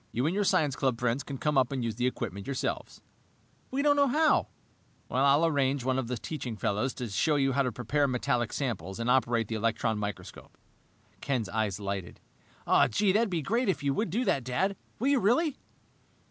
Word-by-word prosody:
You 125 +4 -1
and 160 - +1
your 205 +1 +1
science 150 -7 +2
club 130 -4 0
friends 125 +2 0
can 140 -1 -6
come 150 0 +2
up 130 0 +1
and 130 -3 -2
use 115 -1 -1
the 120 +3 0
equipment 100 -5 -4
yourselves." 140 -1 -4 0.7
"We 275 +2 -1
don't 290 -1 +4
know 285 -1 +4
how!" 310 +4 +3 0.6
"I'll 140 +5 +4
arrange 140 -3 +1
for - - -5
one 130 0 +1
of 125 - -3
the 125 0 -3
teaching 125 -3 -5
fellows 105 +7 -1
to 125 - -4
show 150 - +1
you 135 -1 +2
how 140 +2 +2
to 125 -2 0
prepare 140 +5 0
metallic 125 -2 0
samples 115 -7 -3
and 115 +1 +1
operate 120 -3 +2
the 115 - -4
electron 110 0 0
microscope." 105 -1 -7 0.6
Ken's 125 -8 -2
eyes 105 -3 -1
lighted. 100 -3 -5 0.7
"Gee, 195 - +2
that 205 - +3
would 230 -2 +1
be 170 -4 -2
great 230 - 0
if 185 - -1
you 140 -1 +1
would 215 +6 -1
do 235 +9 -1
that, 135 - +1
Dad! 160 +11 0 0.2
Will 260 +5 0
you, 280 -2 +4
really?" 260 - +2
130 Hz, 205 wpm, -29 LUFS, 115-165 Hz, 0.7 s, don't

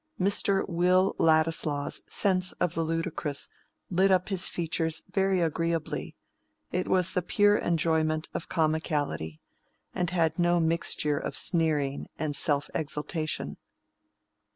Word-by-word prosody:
Mr. 195 0 +2
Will 180 +2 +2
Ladislaw's 155 -2 +2
sense 185 -2 +2
of 180 -3 -1
the 165 - -1
ludicrous 165 -3 -2 0.4
lit 190 +2 +3
up 185 +1 +2
his 190 -2 0
features 165 -1 -2
very 195 -1 +2
agreeably: 165 0 -2 0.6
it 180 0 -1
was 185 -1 +3
the 180 - 0
pure 205 +4 +3
enjoyment 160 -1 +1
of - - -5
comicality, 155 - -1 0.5
and 180 -2 -1
had 165 -2 +1
no 175 0 +3
mixture 160 -3 +1
of - - -4
sneering 150 -5 0
and 150 -1 -2
self 145 -1 +2
exaltation. 155 +1 -3
165 Hz, 120 wpm, -28 LUFS, 155-180 Hz, 0.6 s, lit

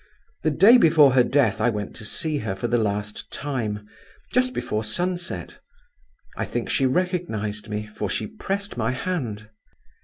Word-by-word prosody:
The 155 - +2
day 200 - +7
before 155 - +6
her 130 -1 +5
death 130 -6 +2
I 120 - +4
went 105 -3 -4
to 110 - -8
see 150 +6 -1
her 105 -3 -3
for 110 +5 -2
the 120 0 +2
last 105 -1 -3
time, 110 -7 -3 0.5
just 255 +1 +3
before 110 - -2
sunset. 175 +10 -3 0.8
I - - -2
think - - -3
she 135 - +3
recognized 130 - -2
me, 105 0 -3
for 105 -1 -5
she - - -1
pressed 200 - -4
my 115 +2 0
hand. 125 - -3
125 Hz, 160 wpm, -24 LUFS, 105-175 Hz, 0.8 s, day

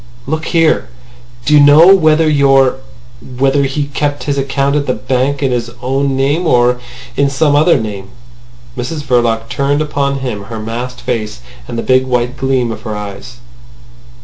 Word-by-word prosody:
"Look 155 +3 -3
here! 165 -2 +1 0.6
Do 150 - +2
you 150 - +7
know 150 +6 +7
whether 160 -3 +3
your—whether 135 -1 0
he 135 +2 -2
kept 145 0 -2
his 145 - -1
account 140 +1 -1
at 145 -1 -1
the 130 - 0
bank 130 +2 -1
in 135 - +1
his 120 -1 -2
own 135 +2 -1
name 145 +6 0
or 125 -3 +3 0.4
in 140 0 +2
some 145 +1 +1
other 155 +3 +4
name." 100 -3 -6 0.7
Mrs 140 +5 -5
Verloc 120 -4 0
turned 140 +3 -1
upon 140 -2 -1
him 105 -6 -4
her 110 +2 -7
masked 120 +3 -6
face 105 - -4 0.3
and - - -6
the 115 - -2
big 130 0 +2
white 125 0 -1
gleam 130 -2 -1
of 110 -1 -7
her 110 -1 -5
eyes. 105 +4 -8
135 Hz, 165 wpm, -14 LUFS, 120-145 Hz, 0.7 s, you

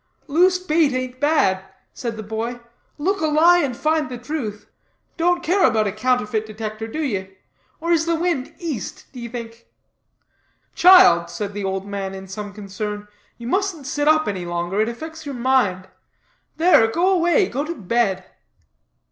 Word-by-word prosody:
"Loose 360 +5 +3
bait 320 -5 +1
ain't 255 0 -4
bad," 275 -11 +2 0.3
said 230 -2 -5
the 220 - -6
boy, 225 +3 -4 0.4
"look 380 +6 -1
a 315 - +2
lie 330 +4 +5
and 265 -7 -1
find 310 -2 0
the 250 - -6
truth; 240 -6 -5 0.5
don't 350 +1 +1
care 370 +4 +2
about 220 -3 +3
a 200 - 0
Counterfeit 220 0 0
Detector, 215 0 -6
do 310 +8 -4
ye? 190 -7 -4 0.4
or 335 +2 -2
is 330 -1 +2
the 335 - +2
wind 325 -6 -2
East, 305 - -5
d'ye 240 -2 -7
think?" 230 -1 -8 1.1
"Child," 260 - +7
said 205 +2 -5
the 205 0 -4
old 190 0 -2
man 195 -1 -5
in 190 0 -9
some 205 +2 -6
concern, 205 +1 -6 0.3
"you 235 - -10
mustn't 370 +1 -1
sit 290 +1 -1
up 310 0 +4
any 190 -3 -3
longer, 175 +3 -2
it 220 - +1
affects 315 +6 -8
your 280 - -4
mind; 235 -8 +1 0.7
there, 325 -9 +5
go 340 +11 +1
away, 350 +1 +3
go 275 +4 -2
to 335 +3 -5
bed." 210 - 0
245 Hz, 165 wpm, -21 LUFS, 210-315 Hz, 1.1 s, Child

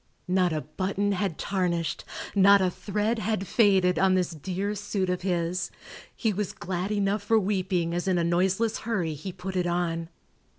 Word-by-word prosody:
Not 180 -1 +2
a 155 -1 -1
button 195 +6 -1
had 195 -4 -1
tarnished, 175 -4 -1 0.3
not 200 0 +7
a 185 -1 +2
thread 210 +5 -1
had 215 -1 -1
faded 190 -5 +3
on 190 -1 +4
this 180 -1 +1
dear 185 +6 -3
suit 200 -2 -2
of 180 - -2
his; 175 -1 -1 0.5
he 220 -3 0
was 205 0 -2
glad 185 +2 -3
enough 205 0 +1
for 220 +2 +3
weeping 185 -4 0
as 175 +2 -2
in 185 -2 +2
a 170 - +2
noiseless 190 +6 +1
hurry 190 -9 -1
he 155 +6 -6
put 185 +1 -6
it 180 -1 +1
on. 170 -1 -1
185 Hz, 175 wpm, -27 LUFS, 175-200 Hz, 0.5 s, not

